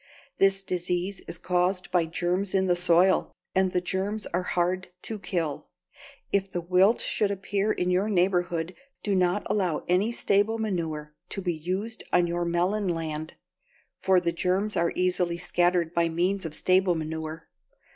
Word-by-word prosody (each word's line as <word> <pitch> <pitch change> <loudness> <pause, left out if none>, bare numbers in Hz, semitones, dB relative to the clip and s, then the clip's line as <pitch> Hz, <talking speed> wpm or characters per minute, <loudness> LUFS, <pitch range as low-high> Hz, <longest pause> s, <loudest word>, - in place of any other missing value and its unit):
This 195 0 +4
disease 180 +1 -2
is - - -5
caused 180 +2 0
by 175 -3 +2
germs 180 +4 -1
in 190 0 +3
the 180 -1 +3
soil, 175 +1 +3 0.2
and 190 -1 +2
the 180 - +1
germs 195 +4 -2
are 180 - +1
hard 180 +1 -1 0.2
to 220 -2 -5
kill. 170 -6 -3 0.6
If 195 -1 +1
the 175 - -2
wilt 185 +6 +3
should 210 - 0
appear 200 +1 -1
in 180 -2 0
your 190 +4 +1
neighborhood, 180 -3 +1 0.3
do 205 - 0
not 185 +1 +2
allow 185 -7 0
any 185 +6 +2
stable 210 0 +2
manure 165 -8 -3 0.2
to 195 - -4
be 175 -1 0
used 185 +8 -4
on 175 -1 +4
your 175 0 -1
melon 180 +4 0
land, 160 -2 -3 0.6
for 190 -1 +4
the 170 -1 0
germs 190 +4 0
are 170 0 +2
easily 180 -1 +1
scattered 175 -1 +1
by 170 -1 +2
means 180 +3 0
of 155 -1 -4
stable 185 -1 +3
manure. 160 0 -5
180 Hz, 160 wpm, -27 LUFS, 170-195 Hz, 0.6 s, This